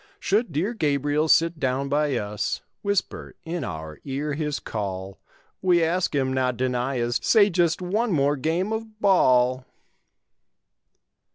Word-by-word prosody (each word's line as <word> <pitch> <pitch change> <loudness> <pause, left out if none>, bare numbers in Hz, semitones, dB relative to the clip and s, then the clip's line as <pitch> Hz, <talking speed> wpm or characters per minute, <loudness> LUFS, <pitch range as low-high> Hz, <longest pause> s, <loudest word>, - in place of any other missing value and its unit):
Should 210 0 0
dear 175 +10 -1
Gabriel 145 - 0
sit 165 +1 +3
down 135 0 -1
by 145 0 +1
us. 105 -2 -3 0.2
Whisper 200 -2 -2
in 165 -1 -3
our 80 -6 -6
ear 145 +2 -3
his 150 -1 -2
call. 95 -3 -5 0.4
We 175 -2 +3
ask 175 0 0
him 130 -2 +1
not 130 -2 0
deny 125 +1 -1
us 120 0 0
Say 210 -3 +4
just 170 0 +1
one 210 +6 0
more 145 -3 +2
game 165 +9 -1
of 220 -1 -6
ball. 130 - +3
145 Hz, 135 wpm, -24 LUFS, 130-180 Hz, 0.4 s, Say